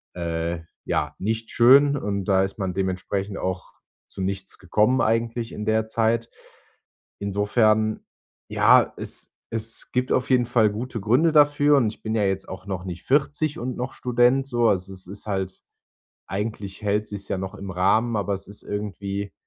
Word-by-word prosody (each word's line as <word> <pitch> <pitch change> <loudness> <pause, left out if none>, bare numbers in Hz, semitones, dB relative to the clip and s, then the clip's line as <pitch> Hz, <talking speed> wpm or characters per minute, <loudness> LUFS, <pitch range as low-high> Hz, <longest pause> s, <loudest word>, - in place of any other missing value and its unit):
äh, 85 -1 -2 0.3
ja, - - -1
nicht 110 +3 -2
schön. 140 +4 +6
Und 100 -5 -2
da 95 -1 +3
ist 95 +2 -4
man 95 -2 -2
dementsprechend 95 +1 -2
auch 95 -1 -4 0.3
zu - - -8
nichts 95 0 -4
gekommen 105 +8 +2
eigentlich 115 +1 0
in 105 - -5
der 110 0 +1
Zeit. 115 +1 +1 0.9
Insofern, 110 +2 +1 0.4
ja, - - +5
es - - -8 0.2
es 110 0 -6
gibt 125 0 0
auf 130 - 0
jeden 125 -2 +4
Fall 115 -3 +3
gute 115 +1 -5
Gründe 125 +11 +3
dafür. 145 -1 +5
Und 120 -5 +3
ich - - -19
bin 110 - -2
ja 110 - +2
jetzt 95 0 -1
auch 95 0 -8
noch 95 -2 -4
nicht 90 -1 -6
40 145 +2 +1
und 125 +1 -4
noch 125 +2 -4
Student 125 +2 +2
so. 120 -3 +2
Also 95 0 -1
es 95 -1 -11
ist 100 +2 -10
halt 95 -2 -3 0.7
eigentlich 100 -1 -4
hält 105 +1 0
sich's 100 -1 -8
ja - - -1
noch 95 +1 -5
im 100 -1 -7
Rahmen. 110 +6 +2
Aber 100 0 -1
es 95 0 -6
ist 100 +1 -11
irgendwie 100 -1 -4
105 Hz, 175 wpm, -24 LUFS, 95-120 Hz, 0.9 s, schön